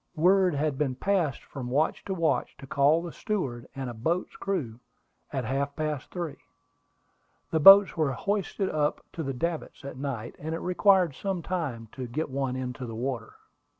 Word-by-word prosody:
Word 180 +1 +4
had 145 -1 -1
been 135 -4 0
passed 175 -2 0
from 130 -3 -7
watch 145 +5 +1
to 195 - -2
watch 160 -7 0
to - - -10
call 145 +5 +3
the 170 - -5
steward 135 - -3
and 135 -1 -4
a 120 - -5
boat's 160 +11 -1
crew 145 - -3 0.5
at 130 -3 -2
half 140 +3 -1
past 155 -3 -3
three. 170 -5 -4 1.1
The 160 - +2
boats 195 +5 +9
were 155 -5 +1
hoisted 200 +3 -1
up 150 -1 0
to 165 - -4
the 135 -3 -3
davits 165 -1 -3
at 140 - -7
night, 130 -4 -4
and 160 +2 -3
it - - -4
required 180 -2 +4
some 190 +2 -3
time 140 -11 -3
to 130 -2 -6
get 145 +5 -3
one 135 -1 -1
into 125 -1 -4
the 115 - -6
water. 120 -1 -4
150 Hz, 180 wpm, -28 LUFS, 130-175 Hz, 1.1 s, boats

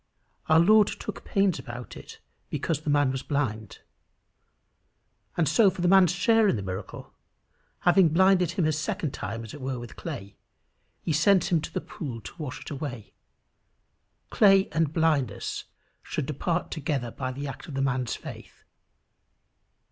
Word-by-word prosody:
Our 160 +1 +6
Lord 210 +4 +6
took - - -6
pains 195 -6 +1
about 120 -1 -8
it - - -11 0.3
because 155 -3 -2
the 155 - -4
man 145 -2 +3
was 130 -1 -3
blind. 115 -8 -3 1.6
And 165 -3 +2
for 195 - +5
the 180 -1 -1
man's 185 -2 +6
share 220 +4 +3
in - - +2
the 100 - -4
miracle, 95 +1 -7 0.7
having 175 -1 +5
blinded 180 +1 +3
him 180 -4 +1
a 155 - +3
second 155 0 -2
time 115 -3 -5
as 110 - -9
it 145 - -9
were 130 0 -3
with 120 -1 -9
clay, 120 - -7 0.7
he 160 - 0
sends 180 +3 +4
him 170 -3 +2
to - - -6
the - - -3
pool 125 -7 -7
to 105 - -11
wash 145 -1 -5
it - - -9
away: 135 -7 -6 1.2
clay 195 -2 +5
and 160 -2 +1
blindness 155 - 0 0.4
should - - -3
depart 165 +5 -2
together 140 -6 -2
by 130 +1 -4
the 140 +3 -5
act 130 -1 -8
of 145 - -7
the 135 - -1
man's 130 -3 -1
faith. - - -11
150 Hz, 160 wpm, -27 LUFS, 130-175 Hz, 1.6 s, Our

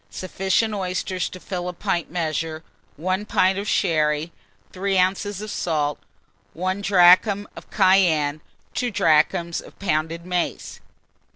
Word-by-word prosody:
Sufficient 190 +4 -1
oysters 185 -1 -2
to 185 - -10
fill 180 -1 -4
a - - -6
pint 170 -1 -2
measure, 160 -1 -3 0.3
1 185 +5 -1
pint 190 0 +2
of 205 - -5
sherry, 155 -2 +1 0.4
3 195 +1 -1
oz. 195 +2 0
of 215 - -6
salt, 150 -4 -1 0.5
1 185 +3 -2
drachm 195 +2 +5
of - - -12
cayenne, 170 -7 +3 0.3
2 250 - -1
drachms 170 -2 +2
of - - -16
pounded 165 -2 -2
mace. 180 -1 -3
180 Hz, 125 wpm, -23 LUFS, 160-195 Hz, 0.5 s, drachm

